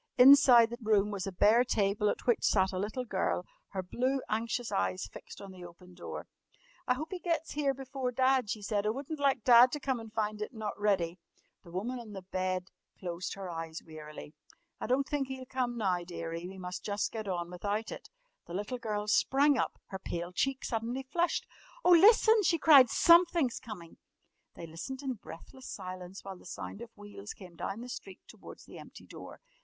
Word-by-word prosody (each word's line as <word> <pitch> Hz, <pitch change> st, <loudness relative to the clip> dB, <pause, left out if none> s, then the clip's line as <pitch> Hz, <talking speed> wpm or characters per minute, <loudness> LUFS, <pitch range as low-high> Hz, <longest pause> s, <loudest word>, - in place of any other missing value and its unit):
Inside 250 Hz, -3 st, +8 dB
the 240 Hz, -, -6 dB
room 210 Hz, -2 st, +2 dB
was 195 Hz, -2 st, -4 dB
a -, -, -3 dB
bare 215 Hz, +6 st, +5 dB
table 210 Hz, -3 st, +1 dB
at -, -, -3 dB
which 240 Hz, -, +2 dB
sat 190 Hz, -2 st, +3 dB
a 185 Hz, -, -3 dB
little 215 Hz, +6 st, -3 dB
girl, -, -, -1 dB, 0.2 s
her 190 Hz, -2 st, -4 dB
blue, 255 Hz, +8 st, -1 dB
anxious 230 Hz, +2 st, -2 dB
eyes 95 Hz, 0 st, -1 dB
fixed 95 Hz, -, -11 dB
on 195 Hz, -1 st, -9 dB
the 185 Hz, -1 st, -11 dB
open 175 Hz, +1 st, -13 dB
door. -, -, -7 dB, 0.6 s
"I 250 Hz, -, +3 dB
hope 310 Hz, +5 st, -5 dB
he 370 Hz, -, -4 dB
gets 335 Hz, -2 st, -2 dB
here 280 Hz, -2 st, 0 dB
before 265 Hz, -1 st, -4 dB
Dad," 260 Hz, -2 st, +2 dB
she 215 Hz, 0 st, -3 dB
said. 205 Hz, 0 st, -1 dB
"I -, -, +3 dB
wouldn't 280 Hz, +6 st, -4 dB
like 275 Hz, -5 st, +2 dB
Dad 245 Hz, 0 st, +8 dB
to 295 Hz, -, -2 dB
come 265 Hz, -3 st, -1 dB
and 225 Hz, -1 st, -10 dB
find 215 Hz, -1 st, -2 dB
it 210 Hz, -, -5 dB
not 215 Hz, -2 st, -3 dB
ready!" 185 Hz, -4 st, +1 dB, 0.4 s
The -, -, -14 dB
woman 220 Hz, +9 st, -3 dB
on 220 Hz, -3 st, -10 dB
the 190 Hz, -2 st, -7 dB
bed 185 Hz, 0 st, -3 dB, 0.3 s
closed 180 Hz, -1 st, -5 dB
her 195 Hz, -1 st, -7 dB
eyes 165 Hz, -1 st, -6 dB
wearily. 155 Hz, -1 st, -10 dB, 0.5 s
"I -, -, -4 dB
don't 265 Hz, +3 st, +1 dB
think 285 Hz, -2 st, -1 dB
he'll 260 Hz, -1 st, -6 dB
come 250 Hz, -2 st, -2 dB
now, 185 Hz, -5 st, 0 dB
dearie. 170 Hz, 0 st, -6 dB
We 190 Hz, +1 st, -10 dB
must 180 Hz, -1 st, -6 dB
just 205 Hz, 0 st, -1 dB
get 220 Hz, -2 st, -5 dB
on 175 Hz, -2 st, -3 dB
without 205 Hz, +5 st, -3 dB
it." -, -, -9 dB, 0.4 s
The 170 Hz, -, -6 dB
little 210 Hz, +6 st, -3 dB
girl 210 Hz, -3 st, -3 dB
sprang 275 Hz, +7 st, +4 dB
up, -, -, -1 dB
her 190 Hz, -, -6 dB
pale 175 Hz, -1 st, -5 dB
cheek 270 Hz, +7 st, -1 dB
suddenly 235 Hz, +3 st, -2 dB
flushed. 335 Hz, +5 st, 0 dB, 0.4 s
"Oh, 360 Hz, -, +6 dB
listen!" 435 Hz, +5 st, +7 dB
she 345 Hz, -3 st, +2 dB
cried; 285 Hz, -6 st, +7 dB
"something's 335 Hz, -6 st, +4 dB
coming!" 180 Hz, -7 st, -10 dB, 0.6 s
They 170 Hz, -, -8 dB
listened 215 Hz, -, -7 dB
in 265 Hz, -2 st, -1 dB
breathless 225 Hz, +11 st, -11 dB
silence, 185 Hz, +1 st, -7 dB
while 190 Hz, -2 st, -8 dB
the -, -, -18 dB
sound 200 Hz, -, -7 dB
of 235 Hz, -, -8 dB
wheels 205 Hz, 0 st, -9 dB
came 180 Hz, -3 st, -13 dB
down 195 Hz, +6 st, -5 dB
the 245 Hz, -, -7 dB
street 195 Hz, -7 st, -8 dB
towards -, -, -13 dB
the -, -, -11 dB
empty -, -, -13 dB
door. -, -, -11 dB
215 Hz, 200 wpm, -31 LUFS, 185-260 Hz, 0.6 s, Inside